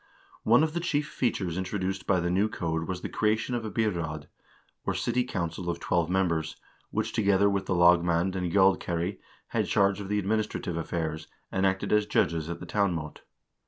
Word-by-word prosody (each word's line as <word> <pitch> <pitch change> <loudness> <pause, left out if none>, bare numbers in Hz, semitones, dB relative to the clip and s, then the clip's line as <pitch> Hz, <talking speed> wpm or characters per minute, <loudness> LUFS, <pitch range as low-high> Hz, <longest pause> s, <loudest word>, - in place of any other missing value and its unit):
One 120 +7 +5
of 155 -1 0
the 170 - -1
chief 150 -3 0
features 95 - -1
introduced 95 0 -3
by 95 -2 +3
the 85 0 -1
new 100 +4 +2
code 80 -4 -2
was 90 -1 -4
the - - -3
creation 110 +3 0
of 120 -2 -1
a 110 - -3
byraad, 85 -10 -2 0.6
or - - -1
city 125 +1 0
council 85 -7 -3
of 85 0 -2
twelve 85 -1 0
members, 85 -4 0 0.3
which - - -2
together 100 -3 +3
with 100 -1 0
the 95 - +1
lagmand 85 +1 +4
and 90 -2 -2
gjaldkeri 95 -1 +2 0.3
had - - 0
charge 100 0 +2
of 100 - -7
the 105 - +1
administrative 105 -3 -1
affairs, 80 -1 -3 0.2
and 95 0 +2
acted 95 +2 -1
as 105 -1 +3
judges 80 -5 +1
at 85 0 -4
the - - -8
town 100 -4 +1
mot. 75 -2 -6
95 Hz, 190 wpm, -28 LUFS, 85-105 Hz, 0.6 s, One